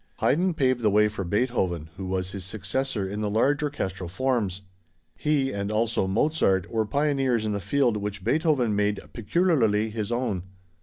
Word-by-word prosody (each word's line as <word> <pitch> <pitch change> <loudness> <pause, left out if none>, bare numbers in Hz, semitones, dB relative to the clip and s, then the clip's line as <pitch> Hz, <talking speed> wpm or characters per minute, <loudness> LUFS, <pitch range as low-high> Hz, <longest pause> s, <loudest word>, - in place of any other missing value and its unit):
Haydn 175 +4 +2
paved 130 -4 +2
the 110 - +3
way 105 +1 +4
for 105 -2 -4
Beethoven, 90 - -1
who 95 0 -6
was 95 0 -2
his 100 -2 -6
successor 105 +3 -2
in 105 +2 -4
the 105 - 0
large 135 +8 +2
orchestral 95 - -3
forms. 100 -3 -1 0.5
He 145 -3 +1
and 100 -1 -3
also 110 -2 +1
Mozart 95 - +1
were 110 -2 0
pioneers 135 -4 +1
in 105 - 0
the 100 - -1
field 120 +2 +1
which 100 -1 -5
Beethoven 130 - +2
made 105 0 +1
peculiarly 115 - +2
his 110 0 -3
own. 120 -6 -1
110 Hz, 165 wpm, -26 LUFS, 100-135 Hz, 0.5 s, way